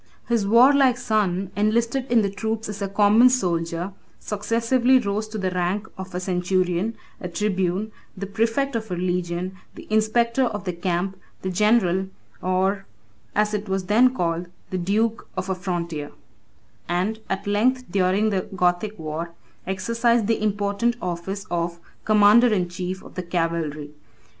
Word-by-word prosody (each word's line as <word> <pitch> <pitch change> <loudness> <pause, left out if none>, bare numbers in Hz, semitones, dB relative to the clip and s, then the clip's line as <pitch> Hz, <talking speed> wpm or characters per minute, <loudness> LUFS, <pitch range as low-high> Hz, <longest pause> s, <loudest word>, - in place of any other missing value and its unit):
His 230 -4 +1
warlike 255 +3 +6
son 205 -6 0
enlisted 235 +5 0
in 230 -3 +5
the 200 - +1
troops 220 +2 -3
as 210 -1 -6
a 200 - 0
common 210 +5 +5
soldier, 175 -5 -1 0.3
successively 230 +5 +2
rose 215 -2 -1
to 215 0 -6
the 190 -2 -1
rank 180 +4 -1
of 190 -2 -8
a - - 0
centurion, 185 +2 0 0.2
a 180 - -5
tribune, 190 +2 -1 0.3
the 200 - -4
præfect 225 +7 0
of 220 -2 -3
a 180 - -2
legion, 180 +1 -2 0.2
the - - -10
inspector 235 +4 +2
of 210 -5 -3
the 180 - -3
camp, 180 +2 -2 0.3
the 190 - -1
general, 190 -2 +2 0.3
or, 190 +2 0 0.5
as 210 0 +2
it 210 -1 -3
was 190 0 0
then 235 +6 +5
called, 170 -3 -1 0.2
the 185 - -1
duke, 215 +5 0
of 185 +1 -2
a - - +2
frontier; 170 -5 -4 0.8
and 185 +6 0
at 195 +2 -2
length, 240 +6 +2
during 195 +3 +2
the 190 -2 -2
Gothic 180 +4 +1
war, 160 +1 -5 0.3
exercised 230 +4 +1
the 225 0 0
important 205 +3 0
office 180 +3 -4
of 170 0 -2 0.3
commander 215 +3 +6
in 180 -4 +1
chief 180 +1 -5
of - - -13
the 185 - -3
cavalry. 165 -4 -2
200 Hz, 150 wpm, -23 LUFS, 180-220 Hz, 0.8 s, warlike